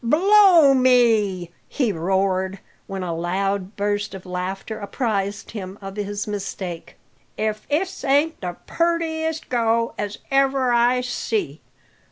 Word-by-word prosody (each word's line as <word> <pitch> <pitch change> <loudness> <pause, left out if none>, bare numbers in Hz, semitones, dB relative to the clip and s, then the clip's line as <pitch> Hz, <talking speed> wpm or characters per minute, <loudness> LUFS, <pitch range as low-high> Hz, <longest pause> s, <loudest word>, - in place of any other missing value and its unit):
"Blow 350 - +6
me!" 225 -9 +3 0.2
he 255 -7 0
roared, 190 +2 0 0.3
when 195 -1 -4
a 170 -2 -3
loud 190 +3 -2
burst 205 0 -1
of 190 - -10
laughter 190 +4 -4
apprised 200 -1 -2
him 195 -3 -7
of 195 -1 -8
his 205 0 -3
mistake, 195 -4 -6 0.4
"if 215 0 -2
this 345 +6 -2
ain't 290 +4 +2
the 180 -2 -5
purtiest 320 -2 -1
go 230 -1 +1
as 205 0 -3
ever 270 -2 +2
I 240 +1 +3
see. 220 - -3
210 Hz, 125 wpm, -22 LUFS, 195-260 Hz, 0.4 s, Blow